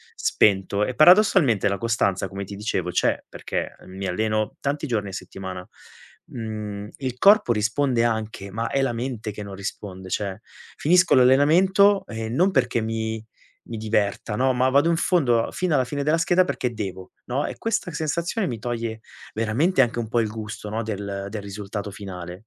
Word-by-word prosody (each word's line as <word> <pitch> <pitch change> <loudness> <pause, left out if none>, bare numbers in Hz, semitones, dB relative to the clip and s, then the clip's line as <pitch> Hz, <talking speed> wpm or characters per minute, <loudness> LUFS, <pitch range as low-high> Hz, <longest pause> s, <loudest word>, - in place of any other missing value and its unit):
spento 100 0 +2
e, 130 - -4
paradossalmente, 170 - +5
la 100 - 0
costanza, 100 -4 0
come 100 +1 -6
ti 100 - -8
dicevo, 100 -4 -2
c'è - - +1
perché - - -4
mi 95 +1 -6
alleno 110 +3 -1
tanti 145 +2 -2
giorni 105 -5 -1
a - - -8
settimana. 95 -1 -7 0.6
Mhmm, 105 -3 -6
il 130 -2 -4
corpo 200 - +6
risponde 115 +3 +1
anche, 110 -3 -2
ma 115 +3 -2
è 135 - +1
la 135 -3 0
mente 115 -2 -4
che 105 0 -7
non 100 -1 -8
risponde, 95 -1 -7
cioè 100 -1 -3 0.4
finisco 180 +3 +4
l'allenamento 175 +10 +5
e 110 0 -5
non 175 +12 +3
perché 120 -6 +1
mi 110 0 -3 0.4
mi 115 - -6
diverta, 105 0 -1
no, 130 +3 +2
ma 130 +1 +2
vado 140 +5 +4
in - - +2
fondo 135 -10 +2
a - - -8
fino 185 -3 -1
alla 130 -3 +3
fine 140 +3 -3
della 155 +3 +2
scheda 175 +2 +4
perché 125 -8 -2
devo, 95 -4 -6
no, 135 +4 -1
e - - -6
questa 225 -4 -1
sensazione 170 +7 -1
mi 120 - -3
toglie 115 -1 -3 0.3
veramente 120 - +2
anche 120 -2 +1
un 115 -1 -2
po' 120 +2 +1
il 110 - +1
gusto, 105 -1 -7
no, 110 +2 -2
del 100 -2 -4
del 110 - -4
risultato 100 +1 -6
finale. 90 -3 -7
115 Hz, 180 wpm, -24 LUFS, 100-135 Hz, 0.6 s, corpo